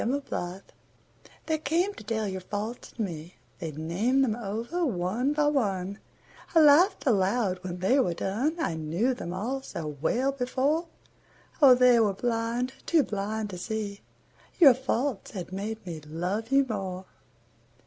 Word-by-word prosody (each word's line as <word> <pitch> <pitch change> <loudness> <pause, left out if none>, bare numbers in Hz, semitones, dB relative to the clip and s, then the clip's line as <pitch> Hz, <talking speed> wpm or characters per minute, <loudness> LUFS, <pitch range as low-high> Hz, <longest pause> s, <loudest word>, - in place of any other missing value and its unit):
Faults 195 -8 -3 0.7
They 315 -1 0
came 335 +7 0
to - - -11
tell 220 0 -2
your 190 -1 -4
faults 210 +5 -5
to 235 - -5
me, 170 -2 -6 0.2
They 165 -3 -4
named 185 - +1
them 225 -5 +1
over 235 - -3
one 230 - 0
by 300 0 +2
one; 200 -9 0 0.6
I - - +8
laughed 315 +6 +5
aloud 200 -4 +2
when 180 -1 -5
they 195 +10 +3
were 175 -10 +1
done, 240 - -1
I 325 - 0
knew 165 +11 0
them 175 -8 -6
all 235 +9 -3
so 170 -10 -6 0.2
well 255 - +1
before, 275 +5 0 0.7
Oh, 265 -3 +9
they 250 -1 +6
were 210 -3 +3
blind, 235 +3 -1
too 325 -3 +4
blind 210 0 -3
to 180 - -6
see 205 0 -4 0.6
Your 290 -8 +9
faults 255 -2 -2
had 185 -4 -6
made 210 +2 -5
me 165 -3 -6
love 180 - -3
you 275 0 +5
more. 190 -4 -4
220 Hz, 155 wpm, -28 LUFS, 185-265 Hz, 0.7 s, Oh